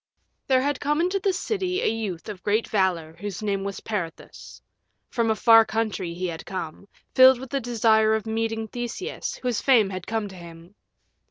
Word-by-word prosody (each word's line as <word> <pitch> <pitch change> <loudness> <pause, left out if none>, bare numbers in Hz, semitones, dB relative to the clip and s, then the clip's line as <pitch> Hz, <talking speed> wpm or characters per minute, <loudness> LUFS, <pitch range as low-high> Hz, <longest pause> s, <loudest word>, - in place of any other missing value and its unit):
VIII - - -51
There 260 -1 +4
had 285 0 -1
come 295 +2 0
into 365 +3 +1
the 390 0 +1
city 375 -1 -2
a - - +2
youth 210 -7 -3
of 205 -4 -7
great 215 +2 0
valor 175 -6 0
whose 205 0 -5
name 200 -2 -1
was 200 0 -5
Peirithous: 180 -7 -6 0.5
from 230 -2 0
a 220 - +2
far 225 +1 +7
country 215 -6 -2
he 185 +1 -3
had 165 -2 -5
come, 185 0 -6 0.3
filled 260 -1 +7
with 265 +1 -10
a 275 - +1
desire 220 -2 +3
of 220 - -3
meeting 225 0 -2
Theseus, 240 - -5
whose 245 -3 0
fame 225 -7 +4
had 185 -1 -6
come 220 -2 -2
to 190 - -12
him. 170 +1 -12
220 Hz, 190 wpm, -25 LUFS, 190-250 Hz, 0.5 s, far